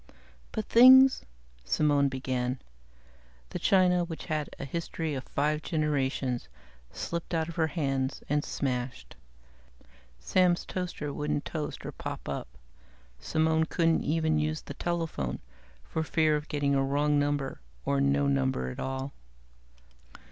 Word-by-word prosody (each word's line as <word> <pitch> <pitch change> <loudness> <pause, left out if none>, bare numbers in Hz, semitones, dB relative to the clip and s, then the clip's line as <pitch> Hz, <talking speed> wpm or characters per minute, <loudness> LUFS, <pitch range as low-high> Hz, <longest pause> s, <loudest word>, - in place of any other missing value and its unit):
"But 220 -2 -3
things 260 +2 +8 0.2
" - - -30
Simone 145 - +2
began. 130 -1 -2 0.9
The - - -3
china 180 -2 +4
which 165 -2 -6
had 155 -2 -2
a - - -5
history 160 +1 -3
of 130 -2 -4
five 150 +2 0
generations 140 -6 -1 0.4
slipped 170 0 -4
out 160 -1 0
of 170 - -7
her 160 -2 +2
hands 135 -4 -2
and 150 +1 +1
smashed; 125 - -3 1.0
Sam's 175 - +2
toaster 175 -6 -4
wouldn't 150 -1 -2
toast 155 -2 -5
or - - -4
pop - - -7
up; - - -3 0.7
Simone 160 0 +1
couldn't 165 -1 +1
even 160 0 +1
use 155 0 -1
the - - -7
telephone 165 - -2 0.5
for 160 - -3
fear 160 -1 +2
of 150 0 -3
getting 145 -1 +1
a 135 - +3
wrong 145 +2 +2
number, 145 - -1 0.2
or 140 0 +1
no 140 +1 +2
number 130 - 0
at - - -9
all. 135 +1 -3
150 Hz, 135 wpm, -29 LUFS, 135-160 Hz, 1.0 s, things